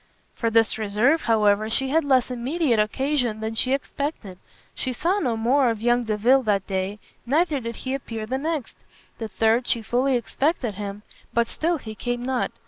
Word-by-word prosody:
For 230 - -1
this 225 0 +3
reserve, 220 +9 +2
however, 215 -1 +3
she 265 +4 +1
had 320 +3 +2
less 260 -3 +2
immediate 250 0 0
occasion 245 +1 0
than 220 +1 -3
she 255 +3 0
expected; 275 - -3 0.3
she 255 - -3
saw 360 +10 0
no 245 - 0
more 250 +3 +3
of 225 -2 -2
young 240 +1 +2
Delvile 225 +5 +3
that 205 -5 0
day; 190 +1 -2 0.3
neither 300 +4 +1
did 230 -2 -5
he 260 +4 -4
appear 225 -5 -4
the 260 +4 -2
next. 310 -3 -3 0.4
The 225 - -3
third 225 +3 +1
she 230 -2 +1
fully 255 +4 +1
expected 250 0 -1
him, 200 +1 -6 0.3
but 235 0 +4
still 335 +6 -1
he 220 -6 -8
came 245 +2 -3
not. 260 -1 -1
240 Hz, 180 wpm, -24 LUFS, 220-270 Hz, 0.4 s, but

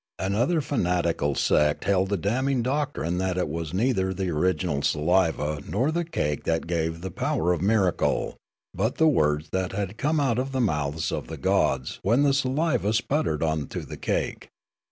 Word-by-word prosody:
Another 120 - +1
fanatical 85 - 0
sect 75 0 +2
held 95 -1 +2
the 100 - +1
damning 125 +7 0
doctrine 130 - -1
that 95 -1 -1
it 90 - 0
was 80 0 -4
neither 95 -2 0
the 95 -1 -2
original 85 -2 0
saliva 75 -2 +1
nor 120 - +1
the 170 +2 0
cake 75 - -2
that 80 0 0
gave 80 -1 -2
the 95 +1 -5
power 85 +1 0
of 85 - -3
miracle, 95 -3 +1 0.4
but 110 +6 -1
the 160 - +4
words 75 - +2
that 95 -1 -1
had 100 +2 -4
come 150 +2 +1
out 130 -4 +1
of 135 +1 -3
the 130 - 0
mouths 80 - 0
of - - -4
the - - -7
gods 65 - 0
when 120 +8 +3
the 140 -1 +4
saliva 130 -4 +1
sputtered 115 - 0
on 80 -2 -1
to - - -5
the - - -8
cake. - - -2
95 Hz, 175 wpm, -26 LUFS, 80-130 Hz, 0.4 s, the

